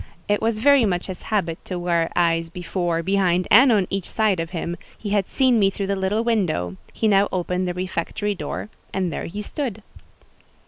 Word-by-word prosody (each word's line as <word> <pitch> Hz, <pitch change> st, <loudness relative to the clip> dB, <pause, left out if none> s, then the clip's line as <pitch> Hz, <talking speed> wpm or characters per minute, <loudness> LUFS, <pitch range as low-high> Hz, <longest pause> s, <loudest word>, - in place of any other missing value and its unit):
It 205 Hz, 0 st, +1 dB
was 225 Hz, -1 st, +1 dB
very 280 Hz, +3 st, +5 dB
much 180 Hz, -4 st, 0 dB
his 185 Hz, -2 st, -7 dB
habit 170 Hz, -6 st, -1 dB
to 180 Hz, -, -4 dB
wear 170 Hz, -2 st, 0 dB
eyes 165 Hz, -1 st, +2 dB
before, 175 Hz, -1 st, -2 dB
behind, 185 Hz, -1 st, +2 dB
and 250 Hz, +4 st, +8 dB
on 205 Hz, -4 st, +3 dB
each 195 Hz, -2 st, -3 dB
side 215 Hz, -5 st, +1 dB
of 165 Hz, 0 st, -3 dB
him: 170 Hz, -1 st, -3 dB, 0.2 s
he 205 Hz, -, -5 dB
had 200 Hz, -2 st, +1 dB
seen 255 Hz, -4 st, +3 dB
me 195 Hz, -2 st, +4 dB
through 195 Hz, 0 st, -4 dB
the 200 Hz, +1 st, 0 dB
little 195 Hz, +4 st, 0 dB
window—he 185 Hz, -, -1 dB
now 200 Hz, -1 st, +4 dB
opened 180 Hz, 0 st, -1 dB
the 175 Hz, -, -3 dB
refectory 185 Hz, +3 st, -2 dB
door, 200 Hz, +2 st, -5 dB, 0.2 s
and 185 Hz, -4 st, -1 dB
there -, -, -4 dB
he 205 Hz, +5 st, -5 dB
stood. 225 Hz, -6 st, -4 dB
190 Hz, 190 wpm, -23 LUFS, 175-210 Hz, 0.2 s, and